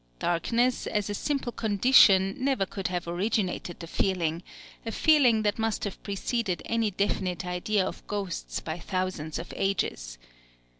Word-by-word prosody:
Darkness, 230 - 0
as 205 -1 -1
a - - -1
simple 275 +2 -2
condition, 205 -3 +5
never 260 -6 +1
could 190 0 -4
have 180 -1 -3
originated 180 0 -1
the 170 - -6
feeling, 170 -2 -1 0.4
a 225 - -4
feeling 255 -7 +4
that 205 +1 0
must 225 -1 -1
have 200 - -5
preceded 200 -1 -2
any 230 -1 +1
definite 185 -2 -1
idea 185 +3 0
of - - -7
ghosts 180 - -3
by 160 +2 -5
thousands 185 -4 -3
of 170 - -7
ages. - - -2
195 Hz, 145 wpm, -27 LUFS, 180-225 Hz, 0.4 s, condition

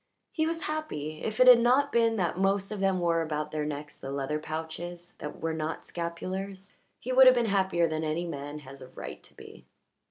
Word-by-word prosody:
He 315 -1 0
was 330 0 -3
happy; 155 - -4
if 215 -1 -3
it 255 - +7
had 250 -2 +10
not 260 +4 +3
been 230 -1 +3
that 180 -6 0
most 195 +2 +1
of 210 - -4
them 195 -1 +2
wore 170 -1 +2
about 150 -1 -3
their 150 -1 -2
necks 145 0 -6
the 135 - -6
leather 140 +2 -2
pouches 165 +3 -6
that 150 - -7
were 165 0 -1
not 160 0 -4
scapulars 190 +3 -5 0.3
he 255 - -4
would 260 0 +8
have 255 - +8
been 240 -1 +2
happier 190 -5 +2
than 155 0 -2
any 160 +3 -1
man 145 -2 -5
has 135 -2 -11
a 130 - -9
right - - -8
to - - -17
be. - - -13
175 Hz, 215 wpm, -29 LUFS, 155-215 Hz, 0.3 s, had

